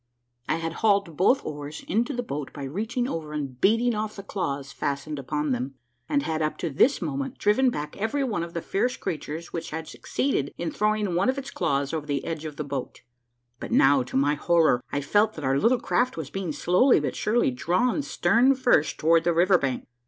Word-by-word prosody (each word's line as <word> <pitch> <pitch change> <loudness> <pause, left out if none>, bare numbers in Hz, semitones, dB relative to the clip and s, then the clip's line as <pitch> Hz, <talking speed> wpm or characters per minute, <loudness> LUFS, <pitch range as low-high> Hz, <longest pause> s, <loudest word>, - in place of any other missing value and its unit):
I 155 - +3
had 165 0 -3
hauled 200 -6 +2
both 245 - +3
oars 145 0 -6
into 230 +8 +1
the 245 -2 -3
boat 145 - -5
by 140 - -7
reaching 225 - -2
over 155 -8 -5
and 135 -4 -5
beating 230 +4 +3
off 215 0 -3
the 195 - -8
claws 140 -9 -3
fastened 140 +1 -3
upon 150 +2 -2
them, 130 +2 -2 0.3
and 140 - +1
had 160 +1 -2
up 155 0 -1
to 165 - -3
this 210 - +3
moment 140 -4 -3
driven 235 +6 +3
back 150 -9 -5
every 225 +7 -1
one 215 -10 -1
of 170 0 -6
the 170 - -3
fierce 245 +6 0
creatures 165 -2 -5
which 165 0 -4
had 160 +1 -5
succeeded 145 - -2
in 170 -1 -3
throwing 210 -2 0
one 185 +8 +2
of 260 - +1
his 270 -3 -6
claws 140 +1 -1
over 155 -2 -3
the 140 -1 -2
edge 160 -1 -4
of 150 -2 -6
the 150 - -4
boat; 140 -2 -5 0.6
but - - -7
now, 135 0 +5
to 125 +1 -3
my 145 +2 +3
horror, 160 -4 +3
I 145 - -1
felt 210 +9 +2
that 155 - -6
our 135 +1 +2
little 240 - +3
craft 250 +2 0
was - - -5
being 195 -4 -3
slowly 180 - +4
but - - -3
surely 225 - +1
drawn 180 - +1
stern 270 -1 +3
first 245 - +2
toward 165 +1 +4
the 170 -1 +1
river 180 +2 +4
bank. 130 -3 -2
165 Hz, 210 wpm, -26 LUFS, 145-215 Hz, 0.6 s, now